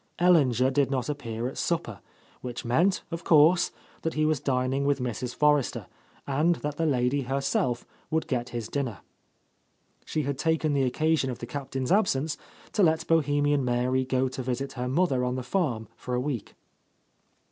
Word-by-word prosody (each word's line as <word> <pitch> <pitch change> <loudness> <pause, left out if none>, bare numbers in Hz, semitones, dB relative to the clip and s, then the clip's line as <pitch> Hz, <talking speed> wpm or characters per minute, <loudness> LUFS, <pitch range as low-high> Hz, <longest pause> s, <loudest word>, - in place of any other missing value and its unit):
Ellinger 135 -8 +4
did 140 -1 +2
not 130 0 -1
ap 145 - -6
pear 115 0 -4
at 130 - -6
supper, 165 - -2 0.4
which 120 -2 -6
meant, 170 +11 +2
of 165 0 -4
course, 165 +3 +5 0.3
that 165 - -2
he 155 0 +2
was 155 -2 +2
dining 130 0 0
with 140 0 +1
Mrs. 125 0 -3
Forrester, 150 -1 +2 0.4
and 155 +5 +2
that 150 -2 -5
the 165 - +1
lady 130 0 +1
herself 135 -2 -1 0.2
would 160 0 0
get 125 -2 -2
his 115 -3 -4
dinner. 130 -6 -3 1.0
She 155 - -2
had 140 0 -3
taken 160 -2 +1
the 135 -2 +2
occasion 155 +2 +1
of 125 - -4
the - - -6
Captain's 135 0 -4
absence 160 -7 +2 0.4
to 215 - +1
let 160 -3 +3
Bohemian 145 -3 +2
Mary 125 +1 +1
go 130 0 +1
to 130 +1 -5
visit 130 +2 -3
her 125 -1 -3
mother 135 -2 +1
on 125 0 -1
the 130 - -3
farm 125 - -1
for 125 - -4
a - - +1
week. 130 -4 -4
135 Hz, 175 wpm, -27 LUFS, 125-155 Hz, 1.0 s, course